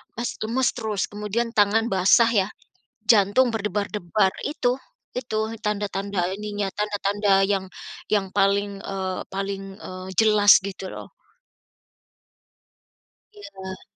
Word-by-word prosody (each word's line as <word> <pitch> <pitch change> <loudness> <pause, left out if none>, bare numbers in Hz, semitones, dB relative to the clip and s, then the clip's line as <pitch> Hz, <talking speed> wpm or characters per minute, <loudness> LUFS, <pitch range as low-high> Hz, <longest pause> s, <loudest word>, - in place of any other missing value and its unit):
mes 235 +2 -2
lemes 250 +4 +1
terus 220 -5 -2
kemudian 210 +3 -2
tangan 215 +3 +4
basah 195 +5 +5 0.2
ya, - - -5 0.6
jantung 215 +4 +5
berdebar-debar, 205 -2 0 0.2
itu 250 -3 0 0.4
itu 250 -4 -3 0.3
tanda-tanda 200 -2 -2
ininya, 205 -1 -3
tanda-tanda 205 0 0 0.2
yang 190 -1 0 0.5
yang 200 -2 +2
paling, 200 +1 +3 0.2
eee, 190 -1 -3
paling, 195 0 -3 0.2
eee, 185 0 -8
jelas 210 -2 +6
gitu 195 0 -7
loh. - - -8 2.3
Iya. 190 - -9
205 Hz, 105 wpm, -24 LUFS, 195-215 Hz, 2.3 s, jelas